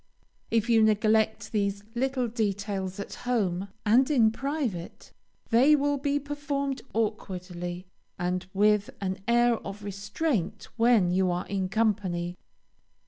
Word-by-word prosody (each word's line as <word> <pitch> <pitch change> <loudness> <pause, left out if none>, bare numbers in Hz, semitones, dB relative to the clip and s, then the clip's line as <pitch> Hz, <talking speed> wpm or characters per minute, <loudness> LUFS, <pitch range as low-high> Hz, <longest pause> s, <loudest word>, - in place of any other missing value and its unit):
If 225 0 +1
you 230 -2 +5
neglect 220 0 +2
these 200 -1 -1
little 255 0 0
details 200 -4 -2
at 200 - -6
home 200 -6 -1 0.2
and 245 +6 +4
in 235 -7 +4
private, 265 - -4 0.4
they 260 +7 +6
will 285 0 +1
be 285 +1 0
performed 285 -1 -3
awkwardly 180 -5 -3 0.3
and 180 0 -2
with 205 +1 +3
an 190 -1 -3
air 240 0 +4
of 200 0 -8
restraint 200 - -2
when 230 -6 +4
you 185 0 +2
are 175 0 -1
in 190 -2 -2
company. 195 -5 0
215 Hz, 125 wpm, -28 LUFS, 190-245 Hz, 0.4 s, they